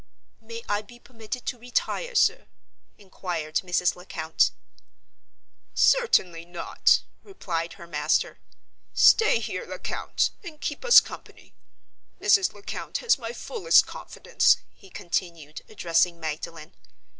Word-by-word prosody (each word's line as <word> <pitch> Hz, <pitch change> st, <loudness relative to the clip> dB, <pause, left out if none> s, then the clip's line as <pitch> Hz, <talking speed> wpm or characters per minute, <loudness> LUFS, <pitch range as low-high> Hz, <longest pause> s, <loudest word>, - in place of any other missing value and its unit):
"May 230 Hz, +1 st, -9 dB
I 205 Hz, 0 st, 0 dB
be 230 Hz, +3 st, -16 dB
permitted 240 Hz, 0 st, -8 dB
to 245 Hz, -, -4 dB
retire, 250 Hz, -, -2 dB
sir?" 470 Hz, +3 st, +2 dB, 0.5 s
inquired 175 Hz, -5 st, -4 dB
Mrs. 180 Hz, -1 st, 0 dB
Lecount. 160 Hz, -3 st, 0 dB, 1.3 s
"Certainly 185 Hz, -, +3 dB
not!" 175 Hz, 0 st, +1 dB, 0.2 s
replied 170 Hz, -, -5 dB
her 170 Hz, -, -12 dB
master. 165 Hz, -, -1 dB, 0.6 s
"Stay 445 Hz, -, +6 dB
here, -, -, -4 dB
Lecount, -, -, -2 dB
and 325 Hz, -4 st, -10 dB
keep 295 Hz, -, -4 dB
us 485 Hz, -1 st, +9 dB
company. -, -, -13 dB, 0.7 s
Mrs. 380 Hz, -3 st, +3 dB
Lecount 205 Hz, -1 st, -6 dB
has 465 Hz, -, +2 dB
my 230 Hz, -2 st, -5 dB
fullest 455 Hz, -, +2 dB
confidence," -, -, +1 dB, 0.2 s
he 195 Hz, -, -18 dB
continued, 170 Hz, -4 st, -4 dB
addressing 170 Hz, -3 st, +1 dB
Magdalen. 160 Hz, +1 st, -6 dB
200 Hz, 110 wpm, -25 LUFS, -, 1.3 s, us